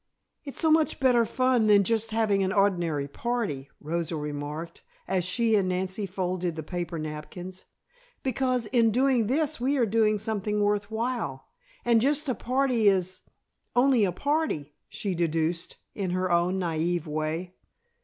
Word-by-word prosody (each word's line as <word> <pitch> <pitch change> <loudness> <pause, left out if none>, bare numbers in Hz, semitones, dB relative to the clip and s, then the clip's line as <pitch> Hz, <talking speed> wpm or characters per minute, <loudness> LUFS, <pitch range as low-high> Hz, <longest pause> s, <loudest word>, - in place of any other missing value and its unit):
"It's 280 -3 -8
so 320 - +3
much 315 0 +3
better 245 -3 +4
fun 255 -2 +2
than 205 -1 +6
just 225 +2 0
having 215 -3 +1
an 190 - 0
ordinary 175 -8 +1
party," 195 - -3
Rosa 165 +2 -3
remarked, 150 +2 -5 0.3
as 185 -1 +1
she 225 +5 +1
and 195 -3 +3
Nancy 190 +2 -2
folded 180 -2 -2
the 160 - -5
paper 175 0 -4
napkins, 155 +4 -7 0.6
"because 255 -2 0
in 230 0 +3
doing 250 -1 +2
this 295 +1 0
we 275 +3 +1
are 245 - +3
doing 215 0 +2
something 210 0 -2
worth 205 0 +1
while, 235 +3 -3 0.4
and 235 -2 +4
just 290 +4 +1
a 255 - +1
party 255 -3 +1
is 185 -2 +2 0.6
only 250 -2 +4
a 190 - +2
party," 280 - -1 0.2
she 200 -3 -3
deduced 165 0 -1 0.2
in 195 -3 -3
her 185 0 -1
own 175 +2 +2
naive 170 -1 -1
way. 155 +4 -3
200 Hz, 155 wpm, -27 LUFS, 175-240 Hz, 0.6 s, than